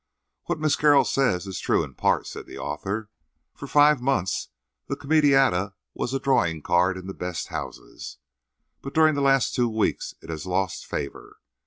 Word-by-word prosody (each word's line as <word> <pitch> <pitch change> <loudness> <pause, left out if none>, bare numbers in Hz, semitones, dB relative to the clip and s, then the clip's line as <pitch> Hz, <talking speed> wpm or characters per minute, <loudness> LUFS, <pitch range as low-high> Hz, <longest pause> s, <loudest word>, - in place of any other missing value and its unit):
"What 175 - -2
Miss 155 -1 +2
Carroll 145 -2 +5
says 125 -10 +1
is 95 -1 -5
true - - +1
in - - -9
part," - - +1
said - - -8
the - - -10
author. 100 +9 -4 0.4
"For - - -9
five 145 -2 +5
months 125 -8 -1 0.4
the 140 - -2
comedietta 135 - +3 0.2
was 120 - -3
a - - 0
drawing 80 - +1
card 90 +2 +2
in 95 - -9
the 95 - -6
best 90 -3 -5
houses. - - -7 0.6
But 135 - -8
during 155 -1 +5
the 140 - -1
last 135 -1 +3
two 120 -2 +1
weeks 110 -1 -1
it 80 - -9
has 80 +3 -6
lost 95 -1 -2
favour. 70 - -6
115 Hz, 175 wpm, -25 LUFS, 90-140 Hz, 0.6 s, Carroll